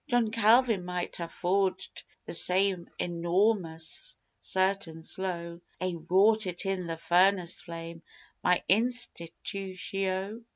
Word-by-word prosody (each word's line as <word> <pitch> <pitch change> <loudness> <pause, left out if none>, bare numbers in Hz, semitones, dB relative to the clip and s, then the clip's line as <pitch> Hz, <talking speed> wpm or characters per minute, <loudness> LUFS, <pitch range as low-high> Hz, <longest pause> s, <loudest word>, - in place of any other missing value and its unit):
John 240 -3 +2
Calvin 230 -2 +4
might 180 0 -4
ha' 170 -1 -5
forged 185 +1 -1 0.2
the - - -6
same 185 +1 +3
enorrmous, 175 - -1 0.2
certain, 190 -4 -1
slow 170 -2 -3 0.2
Ay, 185 -1 -1 0.2
wrought 210 +3 +4
it 175 +2 -3
in 190 -2 -2
the 165 -1 -4
furnace 180 +1 +2
flame 165 -1 -8 0.4
my 180 0 +3
"Institutio." 195 -2 -1
185 Hz, 110 wpm, -29 LUFS, 170-200 Hz, 0.4 s, Calvin